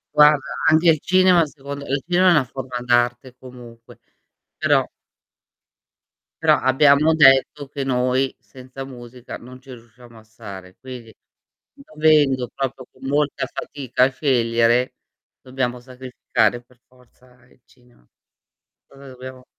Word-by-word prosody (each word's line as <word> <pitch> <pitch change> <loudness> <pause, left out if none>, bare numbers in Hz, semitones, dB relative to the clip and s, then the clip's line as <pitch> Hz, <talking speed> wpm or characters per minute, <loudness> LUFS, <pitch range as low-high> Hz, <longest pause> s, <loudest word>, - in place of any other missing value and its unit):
Guarda, 150 -1 +4
anche 160 +2 +4
il 155 - 0
cinema 185 -1 +3
secondo 140 0 -9
il 135 0 -2
cinema 180 +1 +3
è - - +6
una 150 -5 +3
forma 130 0 -7
d'arte 120 +1 0
comunque, 120 -2 -14 0.6
però - - +1 1.6
però - - +4
abbiamo 140 +4 +3
detto 135 -1 +4
che 140 -1 -5
noi 130 +1 0
senza 130 +1 -11
musica 125 -1 -11
non 130 +2 -14
ci 135 0 -14
riusciamo 120 0 -17
a - - -19
stare, 100 -5 -12
quindi 125 -4 -11 0.6
dovendo 155 - +1
proprio 135 -1 -5
con 135 - -11
molta 145 0 -1
fatica 130 -3 -2
a 130 - +4
scegliere, 120 -3 +1 0.5
dobbiamo 130 -1 -4
sacrificare 125 -1 -2
per 125 0 -28
forza 125 0 -25
il 125 - -28
cinema. 120 - -27 0.8
Cosa 140 0 -15
dobbiamo 130 0 -11
130 Hz, 125 wpm, -21 LUFS, 125-140 Hz, 1.6 s, è